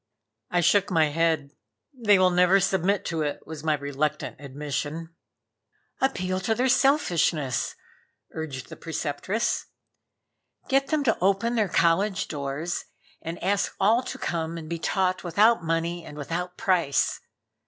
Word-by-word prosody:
I 175 - +2
shook 200 +4 +3
my 160 -4 +3
head 160 -2 0 0.4
"They 220 -6 +4
will 185 -1 +4
never 180 +2 +5
submit 195 +1 +1
to 165 -2 -2
it," 145 -1 -3
was 160 -1 -8
my 155 -1 +2
reluctant 145 +1 -2
admission. 145 +4 -4 0.9
"Appeal 185 -9 0
to 220 +4 0
their 255 +3 +1
selfishness," 180 - +2 0.6
urged 145 -6 -6
the - - -8
Preceptress 165 +7 -2 1.0
"Get 275 0 +2
them 305 -2 +1
to 230 -5 +1
open 200 +5 +2
their 215 -5 +1
college 185 +5 +2
doors 145 +3 -3 0.4
and 165 +1 -5
ask 200 +2 0
all 220 +5 +4
to - - -6
come 165 -1 -3
and 160 -1 -7
be 170 +1 -4
taught 185 +2 0
without 205 +4 +3
money 165 +1 -1
and 150 - -10
without 175 +5 -4
price. 180 -10 +1
175 Hz, 140 wpm, -26 LUFS, 155-200 Hz, 1.0 s, never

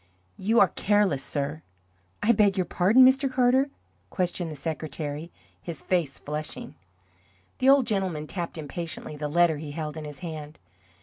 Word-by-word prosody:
"You 220 +5 +3
are 190 - +6
careless, 200 -9 +1
sir!" 145 +2 -3 0.6
"I 220 - +5
beg 205 -3 +3
your 185 - +1
pardon, 210 +11 +5
Mr. 265 +1 +4
Carter?" 255 +2 +3 0.4
questioned 180 -2 -1
the 155 - -6
secretary, 155 +1 -5 0.3
his 165 -5 -6
face 170 -7 0
flushing. 150 -1 -5 0.9
The 260 - +4
old 275 -2 +6
gentleman 185 -8 -1
tapped 170 +1 -4
impatiently 160 +1 -5
the 150 0 -3
letter 165 0 +3
he 150 0 -7
held 155 -1 -4
in 155 - -6
his 150 -2 -8
hand. 155 -2 -7
170 Hz, 150 wpm, -26 LUFS, 150-205 Hz, 0.9 s, are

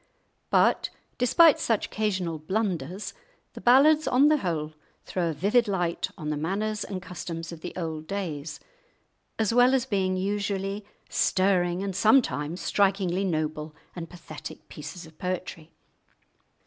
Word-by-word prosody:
But, - - +3 0.3
despite 305 +6 +6
such 225 -3 +1
occasional 185 -7 -2
blunders, 185 +1 -2 0.4
the - - -9
ballads 290 +4 +5
on 265 +3 +5
the 305 - +4
whole 160 - -2 0.3
throw 175 -2 -1
a - - -2
vivid 210 - +2
light 175 -4 -1
on 155 -4 -3
the 150 - -1
manners 210 +7 -1
and 185 -3 -6
customs 165 -2 -6
of 165 -2 -9
the 175 - -5
old 160 -3 -4
days, 165 -7 -4 0.8
as 220 0 +1
well 245 +2 +6
as 260 -2 +1
being 190 -6 0
usually 200 +1 -2 0.2
stirring 185 -1 +2
and 195 -2 -3
sometimes 200 - +2
strikingly 195 -2 +1
noble 155 -3 -2 0.2
and 165 -2 -6
pathetic 170 -3 -10
pieces 155 +4 -8
of 160 -1 -17
poetry. 180 -3 -4
185 Hz, 135 wpm, -27 LUFS, 165-210 Hz, 0.8 s, despite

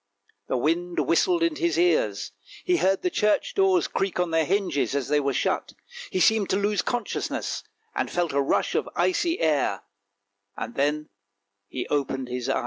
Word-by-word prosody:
The - - 0
wind 170 +6 0
whistled 340 - +2
in 335 -2 +1
his 340 0 0
ears, 360 +8 +1 0.3
he 360 -1 +3
heard 195 - +1
the 360 - +1
church 210 - +1
doors 385 -3 +3
creak 195 -2 -2
on 180 -2 0
their 165 -1 +2
hinges 180 -7 0
as 140 -2 -1
they 150 0 +3
were 140 -1 0
shut, - - -1 0.4
he 185 - -1
seemed 215 +2 +3
to - - +2
lose 205 -1 +1
consciousness, 245 +4 -3 0.3
and - - -1
felt 175 -3 -1
a 140 - +2
rush 135 - +1
of - - -1
icy 345 -1 +1
air 145 -11 +1 0.4
— 100 0 -48
and 115 - -5
then 150 +2 0 0.6
he 125 - -4
opened 135 -3 -1
his 125 0 -3
eyes. - - +1
175 Hz, 180 wpm, -25 LUFS, -, 0.6 s, he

